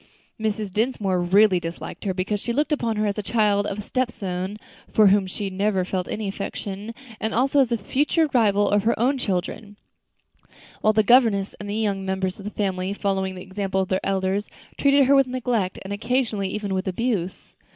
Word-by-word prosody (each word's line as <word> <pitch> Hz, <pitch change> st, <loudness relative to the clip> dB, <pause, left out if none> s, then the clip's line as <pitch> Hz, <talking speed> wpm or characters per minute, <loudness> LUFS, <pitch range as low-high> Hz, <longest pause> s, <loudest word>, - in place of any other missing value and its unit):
Mrs. 215 Hz, -2 st, -2 dB
Dinsmore 210 Hz, -5 st, 0 dB
really 190 Hz, +1 st, +4 dB
disliked 165 Hz, +4 st, -7 dB
her, 190 Hz, -, 0 dB
because 195 Hz, +3 st, -1 dB
she 235 Hz, -, -2 dB
looked 295 Hz, +5 st, 0 dB
upon 235 Hz, -7 st, 0 dB
her 215 Hz, 0 st, 0 dB
as 205 Hz, -, +1 dB
the -, -, -1 dB
child 205 Hz, 0 st, +1 dB
of 195 Hz, -, -4 dB
a -, -, -3 dB
stepson 205 Hz, -5 st, -3 dB, 0.3 s
for 215 Hz, -, +5 dB
whom 195 Hz, -1 st, +4 dB
she 185 Hz, -, -6 dB
had 195 Hz, -1 st, -3 dB
never 195 Hz, -1 st, +1 dB
felt 185 Hz, -1 st, -2 dB
any 210 Hz, -1 st, -3 dB
affection, 200 Hz, +2 st, -5 dB, 0.2 s
and 220 Hz, -1 st, -2 dB
also 270 Hz, +4 st, +3 dB
as 260 Hz, -4 st, +4 dB
the 235 Hz, -, +1 dB
future 295 Hz, -, +1 dB
rival 205 Hz, -4 st, +3 dB
of 205 Hz, 0 st, +3 dB
her 225 Hz, +2 st, +1 dB
own 260 Hz, +3 st, +2 dB
children; 205 Hz, 0 st, -3 dB, 1.0 s
while 215 Hz, -, +4 dB
the 215 Hz, 0 st, +3 dB
governess 220 Hz, -4 st, +4 dB
and 205 Hz, -, -6 dB
the 205 Hz, -, -2 dB
younger 205 Hz, -3 st, -1 dB
members 190 Hz, +1 st, -2 dB
of 200 Hz, -, -9 dB
the -, -, -2 dB
family, 190 Hz, -2 st, -2 dB
following 190 Hz, -2 st, -1 dB
the 180 Hz, -, -8 dB
example 190 Hz, 0 st, -2 dB
of 190 Hz, -, -1 dB
their 190 Hz, -, 0 dB
elders, 195 Hz, +1 st, -1 dB, 0.3 s
treated 280 Hz, -1 st, +4 dB
her 275 Hz, -, +4 dB
with 275 Hz, -1 st, +5 dB
neglect, 245 Hz, -7 st, -1 dB
and 195 Hz, +1 st, -5 dB
occasionally 220 Hz, -2 st, -1 dB
even 205 Hz, -1 st, -3 dB
with 190 Hz, +1 st, -2 dB
abuse. 190 Hz, -2 st, -2 dB
205 Hz, 200 wpm, -24 LUFS, 190-230 Hz, 1.0 s, for